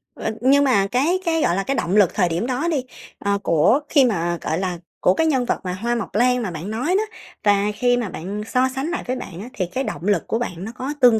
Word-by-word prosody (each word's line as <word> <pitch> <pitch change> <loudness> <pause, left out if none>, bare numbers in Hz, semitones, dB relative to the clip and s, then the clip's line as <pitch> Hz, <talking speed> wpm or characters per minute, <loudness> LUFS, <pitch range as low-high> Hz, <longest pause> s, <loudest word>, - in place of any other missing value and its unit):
Ơ, - - -3
nhưng 275 +3 +5
mà 205 -8 +3
cái 285 - +1
cái, 325 -1 +1
gọi 175 - +2
là, 195 - 0
cái 275 - -1
động 185 -6 0
lực 205 -5 +5
thời 180 -4 +2
điểm 170 +8 -1
đó 260 +6 -1
đi, 300 -6 0 0.4
ờ, 200 0 0
của 170 - +4
khi 280 -4 +5
mà, 175 -7 0
gọi 160 - -1
là, 185 -2 -2 0.2
của 180 - +4
cái 320 +10 +1
nhân 265 -5 +2
vật, - - 0
à, 180 -1 -3
Hoa 235 +6 -1
Mộc 230 -4 -5
Lan 250 +2 +3
mà 205 -6 -3
bạn 170 +5 -6
nói 235 +6 -2
đó 425 - +1 0.4
và 205 -1 +3
khi 245 +1 +2
mà 235 -5 -2
bạn 195 +6 -5
so 255 +2 +2
sánh 270 +3 -2
lại 345 - -3
với 255 - 0
bạn 180 -8 -7
á, 235 - -8
thì 185 - -1
cái 255 +10 -3
động - - -5
lực 205 - +1
của 225 - 0
bạn 180 -7 -4
nó 220 - -5
có 260 +3 -4
tương 240 -3 +6
230 Hz, 275 wpm, -22 LUFS, 190-260 Hz, 0.4 s, tương